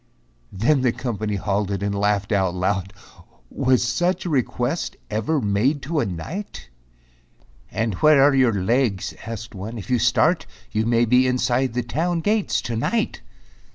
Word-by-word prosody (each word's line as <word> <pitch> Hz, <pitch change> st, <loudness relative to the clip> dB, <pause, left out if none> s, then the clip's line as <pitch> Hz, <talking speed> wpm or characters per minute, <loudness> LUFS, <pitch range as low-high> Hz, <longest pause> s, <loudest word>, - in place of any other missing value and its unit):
Then 130 Hz, +9 st, +2 dB
the 125 Hz, -2 st, +3 dB
company 110 Hz, -4 st, -3 dB
halted 100 Hz, 0 st, -1 dB
and 100 Hz, 0 st, -1 dB
laughed 100 Hz, 0 st, 0 dB
out 95 Hz, -3 st, +1 dB
loud. 95 Hz, +1 st, -1 dB, 0.6 s
"Was 130 Hz, -2 st, +2 dB
such 175 Hz, +9 st, 0 dB
a 175 Hz, -, -2 dB
request 130 Hz, +2 st, -1 dB
ever 110 Hz, +9 st, 0 dB
made 125 Hz, +7 st, +1 dB
to 155 Hz, +3 st, -1 dB
a -, -, 0 dB
knight?" 95 Hz, -, -6 dB, 1.0 s
"And 110 Hz, -1 st, -1 dB
where 145 Hz, +8 st, +5 dB
are 145 Hz, 0 st, +5 dB
your 130 Hz, -4 st, +4 dB
legs," 100 Hz, +1 st, 0 dB
asked 115 Hz, 0 st, -6 dB
one, 105 Hz, +4 st, -6 dB
"if 100 Hz, +2 st, -7 dB
you 125 Hz, -, +3 dB
start, 125 Hz, +9 st, +2 dB, 0.2 s
You 110 Hz, +1 st, 0 dB
may 120 Hz, 0 st, +3 dB
be 125 Hz, +2 st, +4 dB
inside 125 Hz, 0 st, 0 dB
the 125 Hz, -, 0 dB
town 165 Hz, +9 st, -1 dB
gates 210 Hz, +2 st, 0 dB
to 120 Hz, -, -3 dB
night." 220 Hz, -, -1 dB
120 Hz, 155 wpm, -22 LUFS, 100-135 Hz, 1.0 s, where